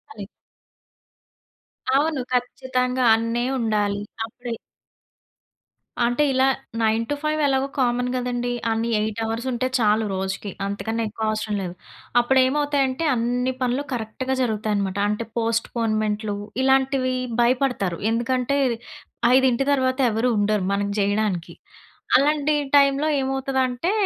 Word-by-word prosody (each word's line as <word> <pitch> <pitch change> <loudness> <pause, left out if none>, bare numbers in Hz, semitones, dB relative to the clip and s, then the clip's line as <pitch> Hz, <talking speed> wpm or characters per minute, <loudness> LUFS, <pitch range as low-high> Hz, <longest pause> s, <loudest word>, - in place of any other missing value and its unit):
అది. 205 -2 -7 1.7
అవును. 295 0 +1
ఖచ్చితంగా 255 0 0
అన్నే 230 +2 -1
ఉండాలి. 210 -3 0 0.2
అప్పుడే 235 +1 -6 1.5
అంటే 245 +5 +2
ఇలా 260 0 +3 0.3
9-5 285 +8 0
ఎలాగో 270 -1 +1
కామన్ 245 -1 +1
గదండీ. 245 -1 -2 0.2
అన్ని 225 +1 -1
8 215 0 -2
అవర్స్ 225 +3 -3
ఉంటే 250 +1 0
చాలు 215 0 +3
రోజుకి. 190 +1 -3
అంతకన్నా 225 +3 -2
ఎక్కువ 220 +1 -3
అవసరం 215 -1 -2
లేదు. 180 -2 -4 0.5
అప్పుడు 260 +2 +3
ఏమవుతాయంటే 285 0 0
అన్ని 245 +2 0
పనులు 255 +2 0
కరెక్ట్‌గా 245 +3 -3
జరుగుతాయనమాట. 210 -4 -1
అంటే 210 +2 -2
పోస్ట్‌పోన్‌మెంట్‌లు 215 -2 -1 0.3
ఇలాంటివి 265 -1 +2 0.3
భయపడతారు. 240 -7 +1
ఎందుకంటే 250 +3 0 0.8
ఐదింటి 260 -1 +3
తర్వాత 260 -1 +1
ఎవరు 225 +3 +1
ఉండరు 205 -1 +1
మనకి 200 0 0
జేయడానికి. 205 -3 0 0.6
అలాంటి 295 +2 +2 0.2
టైములో 280 +1 +4
ఏమవుతదంటే, 265 +2 -1
240 Hz, 105 wpm, -23 LUFS, 215-265 Hz, 1.7 s, టైములో